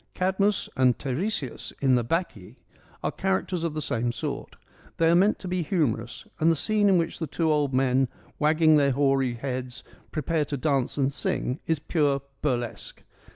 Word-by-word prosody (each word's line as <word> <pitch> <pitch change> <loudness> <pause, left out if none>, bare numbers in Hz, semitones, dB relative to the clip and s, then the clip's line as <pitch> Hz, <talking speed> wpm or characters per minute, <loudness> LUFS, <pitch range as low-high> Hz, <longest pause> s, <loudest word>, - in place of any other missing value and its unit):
Cadmus 195 +2 +1
and 130 -2 +3
Teiresias 145 - -3
in 135 -2 +3
the 120 -1 +3
Bacchae 115 - -3 0.5
are - - 0
characters 190 -2 -1
of 165 -2 -2
the 155 - -2
same 120 -1 -1
sort. - - -5 0.4
They 165 - +3
are - - +5
meant 195 +4 +4
to 185 - -8
be 180 0 -1
humorous, 145 - -1
and 160 +1 +4
the - - +2
scene 210 +4 +2
in 190 - +5
which 165 -1 -1
the 160 - -2
two 160 0 0
old 145 -2 +1
men, 130 0 +2 0.3
wagging 155 +1 +4
their 140 -2 +3
hoary 135 -2 +2
heads, 125 0 -5 0.3
prepare 155 0 0
to 145 - -4
dance 135 -2 0
and 140 0 +1
sing 130 0 -2
is 160 - +2
pure 145 -2 0 0.2
burlesque. 120 -6 -3
145 Hz, 175 wpm, -26 LUFS, 130-170 Hz, 0.5 s, are